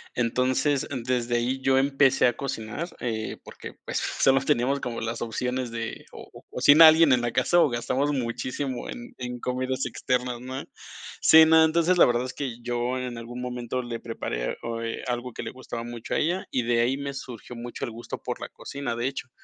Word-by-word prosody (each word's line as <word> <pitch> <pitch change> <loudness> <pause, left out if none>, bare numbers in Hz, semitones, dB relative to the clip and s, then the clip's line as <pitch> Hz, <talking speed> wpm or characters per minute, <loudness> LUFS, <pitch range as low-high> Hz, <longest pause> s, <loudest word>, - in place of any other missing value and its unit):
Entonces, 130 +4 +1 0.2
desde 120 -1 0
ahí 130 +3 -1
yo 130 0 +3
empecé 135 -1 +4
a 120 - 0
cocinar, 135 +4 -4
eh, 110 -3 -3
porque, - - -10
pues, - - -2
solo 135 0 +2
teníamos 135 0 +1
como 120 -2 -4
las 115 +1 -4
opciones 125 +1 -2
de, 115 -1 -5
o - - -11
o, - - -13
cocina 155 +3 +8
alguien 160 -3 +5
en 120 - +3
la 120 - -1
casa, 175 +8 +3
o, 155 - +4
gastamos 125 +5 0
muchísimo 125 0 -3
en 245 0 -8
en 125 -1 -5
comidas 130 +1 -2
externas, 125 0 -2
¿no? 130 +2 -5 0.6
Sí, 160 0 +8
no, 160 0 +6
entonces, 170 +3 +3
la - - +8
verdad 120 0 +1
es 130 - -6
que 125 -4 -5
yo 120 +1 -1
en 125 -2 -4
algún 120 +2 -7
momento 125 0 -3
le 120 -1 -6
preparé, - - -4
oh, 115 0 -4
eh, 115 0 -4
algo 125 0 -3
que - - -6
le - - -5
gustaba 120 -2 -7
mucho 120 -1 -5
a - - +2
ella, 175 +4 0
y 125 - 0
de 120 0 +2
ahí 125 +3 +1
me 140 0 -4
surgió 125 -3 -8
mucho 120 +1 -5
el - - -6
gusto 115 +2 -7
por - - -5
la - - -5
cocina, 140 -4 -5
de 120 +2 0
hecho. 135 -1 -5
125 Hz, 205 wpm, -26 LUFS, 120-135 Hz, 0.6 s, cocina